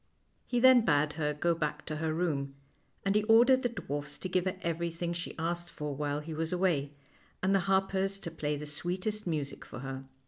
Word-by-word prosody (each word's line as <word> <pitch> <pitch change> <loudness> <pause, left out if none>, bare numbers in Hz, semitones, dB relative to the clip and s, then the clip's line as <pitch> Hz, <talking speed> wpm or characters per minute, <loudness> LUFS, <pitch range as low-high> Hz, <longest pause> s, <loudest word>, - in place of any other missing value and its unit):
He 245 - +1
then 255 -1 +7
bade 150 -4 +3
her 150 -1 0
go 170 +4 +1
back 150 -2 -3
to 155 - -3
her 160 0 -1
room, 145 -5 -1 0.5
and 195 - +3
he 210 - +4
ordered 240 +4 +6
the 245 - +1
dwarfs 145 - -5
to 185 - -5
give 180 0 +1
her 185 0 -1
everything 170 +1 -2
she 170 0 -5
asked 170 +1 -2
for 150 -3 -4
while 145 +1 -1
he 160 +1 -6
was 160 +1 -2
away, 170 -6 +1 0.5
and 190 +1 +3
the 195 - +5
harpers 195 0 +2
to 170 -4 -6
play 150 -2 -2
the 150 - -6
sweetest 185 +7 -3
music 150 -4 -3
for - - -9
her. 135 0 -6
165 Hz, 205 wpm, -31 LUFS, 150-190 Hz, 0.5 s, then